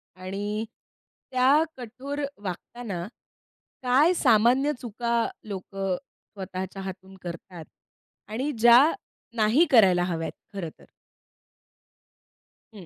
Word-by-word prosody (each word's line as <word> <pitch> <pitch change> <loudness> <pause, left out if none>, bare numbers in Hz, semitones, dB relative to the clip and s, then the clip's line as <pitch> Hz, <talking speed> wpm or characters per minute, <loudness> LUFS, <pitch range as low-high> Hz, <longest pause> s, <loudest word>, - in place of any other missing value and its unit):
आणि 200 +4 -4 0.7
त्या 265 +4 +5
कठोर 260 +4 -6 0.2
वागताना 190 0 -5 0.8
काय 270 +8 +4
सामान्य 255 0 +4
चुका 235 0 -2 0.3
लोकं 195 -1 -3
स्वतःच्या 190 -3 -8
हातून 190 0 -8
करतात 170 -1 -8 0.7
आणि 260 +7 -1
ज्या 240 +2 +8 0.5
नाही 225 +9 +4
करायला 190 -7 +6
हव्यात 165 -2 -2 0.2
खरं 180 -5 -3
तर. - - -17 1.9
हं. 190 -5 -11
210 Hz, 90 wpm, -26 LUFS, 185-250 Hz, 1.9 s, ज्या